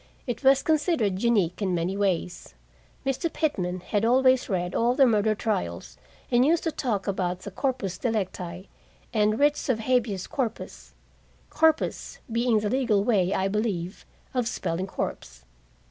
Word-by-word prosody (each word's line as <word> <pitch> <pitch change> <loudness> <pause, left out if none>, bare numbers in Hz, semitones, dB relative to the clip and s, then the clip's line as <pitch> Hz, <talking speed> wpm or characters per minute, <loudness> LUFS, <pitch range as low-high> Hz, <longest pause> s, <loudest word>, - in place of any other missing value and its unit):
It 245 +2 -4
was 270 0 +5
considered 290 - +1
unique 205 -7 +1
in 185 -3 0
many 175 +3 -1
ways. 185 -3 -2 0.5
Mr. 270 +5 -1
Pitman 185 - -1
had 205 +3 -1
always 255 +2 +3
read 180 -2 -1
all 240 +2 +2
the 275 -1 +6
murder 215 -2 +2
trials, 85 - -3 0.4
and 245 0 +5
used 320 +4 +2
to 325 - 0
talk 220 -10 -2
about 185 -2 -2
the 200 - -7
corpus 200 -6 -2
delicti 185 -5 -3 0.5
and 215 -1 +2
writs 290 0 +2
of 225 -3 +1
habeas 225 -6 0
corpus 225 - -5 0.6
corpus 320 0 +1
being 230 -1 +2
the 210 - -1
legal 240 -6 +2
way, 195 -5 +2
I 190 -1 +1
believe, 195 -3 -2 0.3
of 250 -3 0
spelling 185 -3 -2
corpse. - - -5
215 Hz, 145 wpm, -26 LUFS, 185-255 Hz, 0.6 s, the